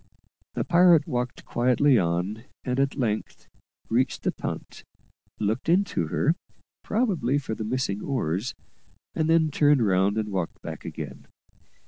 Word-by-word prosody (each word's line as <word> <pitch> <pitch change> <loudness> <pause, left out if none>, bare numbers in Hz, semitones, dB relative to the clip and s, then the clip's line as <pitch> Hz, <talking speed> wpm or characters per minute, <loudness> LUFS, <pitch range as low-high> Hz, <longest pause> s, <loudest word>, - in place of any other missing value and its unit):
The - - 0
pirate 175 -3 +5
walked 125 0 -3
quietly 125 +1 +3
on, 90 +6 -1 0.2
and 125 +1 -1
at 140 0 +1
length 110 -5 -2 0.4
reached 125 +3 0
the - - +1
punt, - - -6 0.5
looked 110 +8 -1
into 175 - +2
her, 150 - +2 0.5
probably 185 - +1
for 135 -6 -3
the 110 - -4
missing 110 -3 -1
oars, 115 - -2 0.6
and 160 0 0
then 160 -1 +4
turned 145 -4 +4
round 95 +2 +2
and 110 -1 -1
walked 95 -4 -3
back - - -7
again. - - -7
125 Hz, 135 wpm, -26 LUFS, 105-145 Hz, 0.6 s, pirate